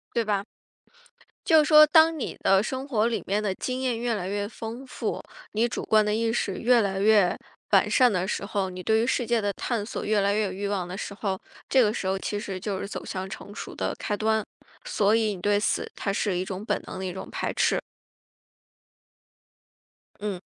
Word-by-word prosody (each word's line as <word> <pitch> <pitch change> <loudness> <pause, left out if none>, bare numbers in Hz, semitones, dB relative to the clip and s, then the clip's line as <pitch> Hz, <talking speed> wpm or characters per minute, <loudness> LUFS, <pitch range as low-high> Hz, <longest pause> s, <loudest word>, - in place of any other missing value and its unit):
对 235 - +2
吧？ 205 -2 -1 1.0
就 320 -5 +6
说 305 0 +8
当 320 +1 +5
你 275 - -4
的 195 +1 +4
生 260 +3 -4
活 225 -5 +2
里 235 - -1
面 205 +2 0
的 200 -3 0
经 255 +5 -3
验 250 -3 -1
越 240 0 0
来 190 -4 -3
越 205 0 -2
丰 230 +4 -7
富， - - -3 0.3
你 225 +3 +1
主 235 - -4
观 215 -1 +4
的 210 - 0
意 225 0 +1
识 200 -4 -1
越 245 +1 +4
来 195 -3 0
越 205 -3 +4 0.3
完 - - +5
善 250 -2 +5
的 180 -2 0
时 195 - -3
候， 200 -2 -1
你 185 0 -7
对 220 +4 +2
于 235 - 0
世 255 -1 +1
界 235 -2 +2
的 205 -1 0
探 220 +1 -2
索 - - -5
越 210 -1 +2
来 200 0 +2
越 215 +1 +1
有 195 - -3
欲 200 +2 -3
望 190 -3 -2
的 180 +2 -6
时 200 - -5
候， 195 -2 -3 0.3
这 260 -2 +5
个 210 -1 +2
时 195 - -3
候 190 +1 +1
其 205 +1 -3
实 200 -3 -5
就 195 0 -3
是 - - -4
走 200 - -6
向 190 0 -5
成 200 +1 -9
熟 - - -7
的 - - -2
开 210 - -1
端。 220 +1 +1 0.4
所 210 - +2
以 220 -2 +1
你 180 - -10
对 205 +1 +2
死， 210 - -1
它 195 - -2
是 200 -2 0
一 180 - -2
种 190 +1 -5
本 210 -3 -1
能 - - -6
的 190 - -4
一 185 - -2
种 190 +1 -8
排 - - -2
斥。 - - +1 2.4
嗯。 205 -3 -3
210 Hz, 240 characters per minute, -26 LUFS, 195-230 Hz, 2.4 s, 说